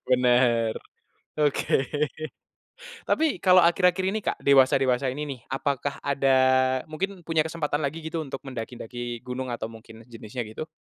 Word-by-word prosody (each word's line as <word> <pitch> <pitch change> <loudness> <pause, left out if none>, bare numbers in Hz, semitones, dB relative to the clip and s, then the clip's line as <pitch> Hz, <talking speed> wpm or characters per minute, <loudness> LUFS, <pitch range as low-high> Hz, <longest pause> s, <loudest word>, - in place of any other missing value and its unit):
Bener. 120 -3 +3 0.6
Oke. 145 -2 +1 1.2
Tapi 310 - +1
kalau 185 -1 +5
akhir-akhir 180 +2 +3
ini 220 - -1
Kak, - - -2
dewasa-dewasa 135 -1 +3
ini 145 +4 -4
nih, - - -21
apakah 140 +1 -2
ada 135 -2 +3 0.5
mungkin 180 +3 -5
punya 165 -1 +2
kesempatan 155 -2 -2
lagi 155 +3 -3
gitu 160 0 -3
untuk 135 -2 -5
mendaki-daki 120 -1 -6
gunung 125 0 -4
atau 120 -2 -3
mungkin 115 0 -12
jenisnya 115 0 -7
gitu? 135 +9 -7
135 Hz, 135 wpm, -26 LUFS, 120-160 Hz, 1.2 s, kalau